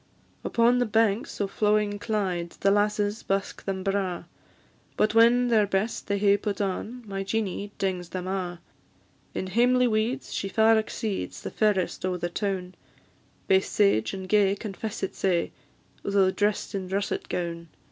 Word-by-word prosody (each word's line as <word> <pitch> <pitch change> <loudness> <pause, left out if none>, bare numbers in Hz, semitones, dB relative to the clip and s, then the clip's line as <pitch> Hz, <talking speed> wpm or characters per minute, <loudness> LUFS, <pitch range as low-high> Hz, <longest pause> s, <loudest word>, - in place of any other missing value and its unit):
Upon 240 +1 +3
the 245 - +1
banks 220 0 +1
o' 205 - +1
flowing 210 +1 +1
Clyde 185 -6 -2
The 195 - +4
lasses 205 +1 +1
busk 195 0 -2
them 190 -1 -3
braw; 195 -3 -1 0.7
But 215 0 +2
when 240 +2 +5
their 215 -3 +4
best 200 +4 -1
they 200 - 0
hae 200 0 +4
put 205 -1 -3
on, 210 +5 -3
My 195 -1 -3
Jeanie 200 0 -2
dings 180 -3 -2
them 185 -1 -4
a'; 180 -2 -3 0.8
In - - -2
hamely 245 +6 +3
weeds 230 +4 -1
she 195 - -2
far 220 +2 +4
exceeds 215 -1 -4
The - - -5
fairest 205 -5 0
o' 185 -1 -1
the 175 0 -3
toun; 185 -1 -3 0.7
Baith 190 0 +4
sage 155 - +2
and 190 -1 -6
gay 200 -1 +3
confess 215 +1 -6
it 195 - -2
sae, 175 -3 0 0.5
Though 195 -1 +2
drest 205 +1 -1
in 190 -2 -4
russit 200 +1 -2
goun. 170 -1 -3
200 Hz, 155 wpm, -26 LUFS, 190-215 Hz, 0.8 s, when